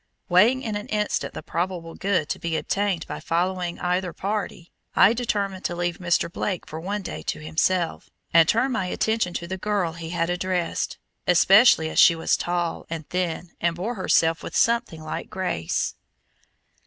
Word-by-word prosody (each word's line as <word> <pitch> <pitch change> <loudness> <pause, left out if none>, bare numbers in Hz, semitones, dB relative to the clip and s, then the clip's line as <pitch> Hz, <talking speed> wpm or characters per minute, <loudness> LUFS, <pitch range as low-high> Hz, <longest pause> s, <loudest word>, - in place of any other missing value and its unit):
Weighing 225 +9 +4
in 220 -3 -3
an 205 - -5
instant 210 -1 -1
the - - -6
probable 170 -1 -3
good 185 -6 0
to - - -2
be 165 -1 -1
obtained 200 -3 -1
by - - -6
following 175 +1 -1
either 180 0 -1
party, 195 -4 -4 0.2
I 215 - +6
determined 200 -5 -2
to 175 - -1
leave 175 0 -2
Mr. 175 -1 +1
Blake 180 +1 -3
for 155 - -7
one 200 +4 -3
day - - -6
to - - -3
himself, 165 +3 0 0.2
and 165 -1 +6
turn 255 +4 +2
my 190 -6 -1
attention 220 -2 0
to 170 - -3
the 190 +2 -5
girl 200 -5 0
he 165 -1 -7
had 170 0 -1
addressed, 180 -1 -2 0.3
especially 185 0 +6
as - - -1
she 170 - +8
was 165 - +1
tall 175 -1 -2
and 160 -2 -5
thin 180 -1 -2
and 170 0 +1
bore 195 +8 -3
herself 165 -5 +2
with - - -7
something 230 -9 +1
like 155 - -5
grace. 180 - -2
180 Hz, 175 wpm, -24 LUFS, 170-200 Hz, 0.3 s, she